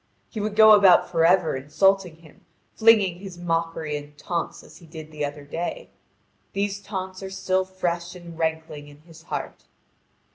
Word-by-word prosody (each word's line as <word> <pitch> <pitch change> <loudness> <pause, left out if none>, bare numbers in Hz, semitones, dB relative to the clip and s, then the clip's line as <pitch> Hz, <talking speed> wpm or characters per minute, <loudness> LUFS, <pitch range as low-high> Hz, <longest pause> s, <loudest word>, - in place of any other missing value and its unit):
He 220 - -5
would 210 0 -3
go 220 0 +8
about 200 -4 +6
for 165 -2 0
ever 180 -4 +3
insulting 180 +6 +1
him, 160 -2 -20 0.3
flinging 210 -6 +4
his 190 -2 -9
mockery 165 -3 -2
and 145 0 -9
taunts 170 +3 -4
as - - -15
he 170 - -17
did 155 -1 -10
the 150 -1 -5
other 145 0 -5
day. 175 - -5 0.6
These 200 0 -2
taunts 190 -1 -6
are 190 - -6
still 190 -1 -1
fresh 175 -2 -3
and 170 -2 -11
rankling 160 -2 -3
in 145 0 -16
his 165 0 -16
heart. 170 - -6
175 Hz, 170 wpm, -24 LUFS, 160-190 Hz, 0.6 s, go